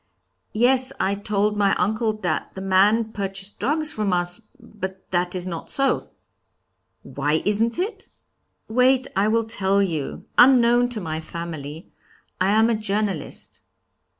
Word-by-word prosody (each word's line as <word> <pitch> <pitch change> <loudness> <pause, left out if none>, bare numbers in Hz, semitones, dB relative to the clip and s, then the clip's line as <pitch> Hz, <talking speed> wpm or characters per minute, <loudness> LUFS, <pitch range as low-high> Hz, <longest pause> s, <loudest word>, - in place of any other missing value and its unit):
'Yes, 255 +3 +3
I 195 - +1
told 205 +1 0
my 200 -1 +3
uncle 220 +1 0
that 175 -3 -2
the 190 - -6
man 205 +4 +3
purchased 195 -1 -4
drugs 305 +1 0
from 210 -3 -1
us, 175 +3 -1 0.2
but 190 -2 -8
that 175 0 0
is 180 -1 -2
not 170 -3 -6
so.' 275 0 +1 0.9
'Why 150 +2 -1
isn't 220 +3 +1
it?' 390 +6 -3 0.6
'Wait, 255 +3 +3
I 195 +2 +2
will 230 +1 +2
tell 200 -3 0
you. 165 -8 -2
Unknown 245 -1 +6
to 230 -4 -5
my 160 -2 -3
family 160 -1 -7 0.5
I 185 +1 +2
am 220 +2 +4
a 235 - +2
journalist.' 205 -6 -3
205 Hz, 140 wpm, -23 LUFS, 185-230 Hz, 0.9 s, Unknown